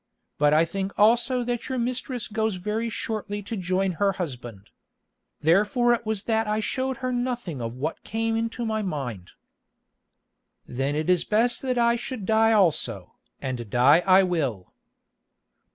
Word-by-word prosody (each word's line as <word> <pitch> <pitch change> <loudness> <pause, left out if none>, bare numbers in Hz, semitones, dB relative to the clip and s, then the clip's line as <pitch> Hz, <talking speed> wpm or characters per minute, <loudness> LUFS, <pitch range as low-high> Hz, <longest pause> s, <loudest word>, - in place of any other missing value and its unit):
But 145 0 +4
I 155 +2 +4
think 195 +3 -4
also 240 +4 +3
that 240 -1 -3
your 260 - -2
mistress 250 0 -3
goes 220 -1 -1
very 210 +5 -2
shortly 205 -2 -4
to 225 - -5
join 185 0 0
her 195 +3 +1
husband. 120 - -7 0.7
Therefore 210 - +3
it 235 -2 -3
was 215 -2 -1
that 225 -1 0
I 210 0 0
showed 260 +4 -2
her 255 - -1
nothing 245 - -3
of 115 +1 -4
what 150 +6 -4
came 225 +1 -1
into 230 +1 -2
my 220 -1 -1
mind." 135 - -5 1.3
"Then 135 +3 -2
it 155 +1 -2
is 180 -2 +3
best 235 +3 +1
that 255 -2 -1
I 235 0 +3
should 250 -4 -6
die 220 +2 +4
also, 190 -8 +1 0.3
and 125 -4 -4
die 130 +8 +5
I 190 +1 +5
will." 140 - -2
205 Hz, 155 wpm, -25 LUFS, 160-235 Hz, 1.3 s, die